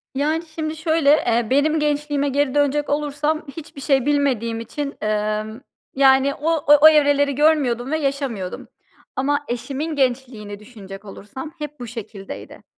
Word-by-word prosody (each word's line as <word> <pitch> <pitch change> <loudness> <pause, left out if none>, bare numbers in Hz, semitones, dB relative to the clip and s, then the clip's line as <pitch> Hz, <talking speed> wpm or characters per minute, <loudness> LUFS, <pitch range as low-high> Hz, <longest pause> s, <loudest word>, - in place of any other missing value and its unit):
Yani, 310 +4 0
şimdi 315 -1 -3
şöyle, 315 -2 +1
eee, 240 -6 +2
benim 305 +4 +2
gençliğime 290 -1 0
geri 280 0 0
dönecek 290 0 +1
olursam 295 +2 -1
hiçbir 290 -3 -9
şey 270 -3 +2
bilmediğim 260 -6 0
için, 280 +5 -5
emm, 215 +2 -2 0.3
yani, 270 0 +4
o 315 +3 -1 0.3
o 310 - +10
evreleri 285 -2 +3
görmüyordum 275 -4 +2
ve 315 - +1
yaşamıyordum. 275 -10 -3 0.5
Ama 290 +2 0
eşimin 280 +6 -4
gençliğini 245 -6 -2
düşünecek 205 -3 -11
olursam 265 +9 -9
hep 300 -1 -7
bu 245 - -6
şekildeydi. 220 -4 -9
280 Hz, 135 wpm, -21 LUFS, 235-295 Hz, 0.5 s, o